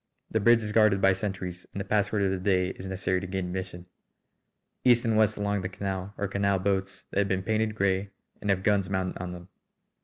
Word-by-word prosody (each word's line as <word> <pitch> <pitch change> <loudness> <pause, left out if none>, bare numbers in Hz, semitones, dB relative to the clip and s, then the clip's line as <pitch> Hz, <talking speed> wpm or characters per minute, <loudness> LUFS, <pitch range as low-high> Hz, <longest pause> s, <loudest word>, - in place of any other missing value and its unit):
The 110 - +2
bridge 115 +2 +5
is 105 - -3
guarded 110 -2 +4
by 95 0 +5
sentries 95 -2 -5
and - - -6
the 100 - -3
password 105 0 +1
of 95 - +2
the 95 - -1
day 90 -1 +2
is 95 0 -7
necessary 95 -1 -1
to 95 - -5
gain 95 0 -2
admission. 90 -1 -5 1.0
East 120 -2 +5
and 115 -1 +2
west 110 0 +3
along 100 -1 -1
the 90 - -3
canal 95 +1 -4
are 100 - -1
canal 100 0 +1
boats 95 0 -2
that - - 0
have 100 - +2
been 95 -1 -1
painted 110 +1 0
grey 100 -1 +1 0.3
and 105 - -3
have 95 -1 +1
guns 100 -3 +2
mounted 95 -2 -2
on 90 -1 -4
them. 90 +1 -11
95 Hz, 220 wpm, -28 LUFS, 95-105 Hz, 1.0 s, bridge